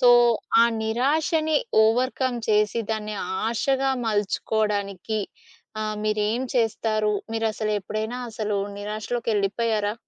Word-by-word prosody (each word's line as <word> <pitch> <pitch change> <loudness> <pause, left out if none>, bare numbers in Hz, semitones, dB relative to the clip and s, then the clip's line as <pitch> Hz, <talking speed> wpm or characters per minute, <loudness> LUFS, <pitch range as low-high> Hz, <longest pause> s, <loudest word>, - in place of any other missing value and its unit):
So, 245 - +7 0.5
ఆ - - +7 0.2
నిరాశని 310 +7 +1 0.3
overcome 250 +2 +1
చేసి 210 +2 +3
దాన్ని 215 -1 -4 0.3
ఆశగా 270 +3 +1 0.2
మల్చుకోవడానికి 210 -1 -1 0.6
ఆహ్, 215 0 -2
మీరేం 215 +3 0
చేస్తారు? 215 -2 +1 0.2
మీరసలు 220 -1 -1
ఎప్పుడైనా 215 +5 -4
అసలు 215 -2 -2 0.2
నిరాశలోకెళ్ళిపోయారా? 215 0 -1
220 Hz, 90 wpm, -24 LUFS, 210-240 Hz, 0.6 s, So